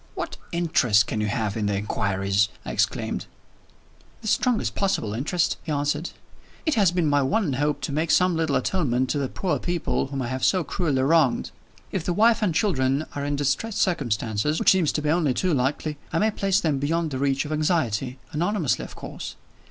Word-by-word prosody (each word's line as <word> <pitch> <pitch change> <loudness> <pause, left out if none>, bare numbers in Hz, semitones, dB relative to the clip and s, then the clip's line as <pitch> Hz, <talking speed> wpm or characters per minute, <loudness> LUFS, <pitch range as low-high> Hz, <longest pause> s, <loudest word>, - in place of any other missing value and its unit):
"What - - -4
interest 150 - +3
can 110 - -2
you 105 - 0
have 105 0 -1
in 105 -2 -1
the 100 - 0
inquiries?" 100 0 0 0.2
I - - -4
exclaimed. - - -1 1.0
"The - - -5
strongest 245 +1 +1
possible 190 - -1
interest," 155 +9 0
he 155 - -5
answered. 145 +3 -1 0.6
"It 315 - +2
has 200 -8 +4
been 175 -2 +1
my 145 -1 +3
one 145 +4 +1
hope 145 +2 0
to - - -3
make 155 +4 -1
some 180 -1 +4
little 160 -3 0
atonement 130 -8 0
to 145 - 0
the 140 - 0
poor 185 - -1
people 175 -5 -1
whom 135 -1 -3
I - - -3
have 130 0 -3
so 185 -2 +3
cruelly 150 -7 0
wronged. 145 -3 +2 0.4
If 190 - -2
the 175 - -1
wife 225 +4 +4
and 205 -4 +2
children 140 -7 +1
are 140 - -4
in 145 0 -1
distressed 145 +10 -1
circumstances 125 - 0
(which - - +5
seems 185 -5 +3
to 150 - -2
be 150 - 0
only 155 -6 +2
too 185 -3 +1
likely) 145 +3 -1
I 165 - 0
may 215 +5 +2
place 195 -1 +1
them 155 -7 0
beyond 160 +3 0
the 130 - -3
reach 135 +1 +1
of 150 - -6
anxiety 140 - 0 0.2
anonymously, 175 0 0
of - - -9
course. - - -7
150 Hz, 200 wpm, -24 LUFS, 130-175 Hz, 1.0 s, which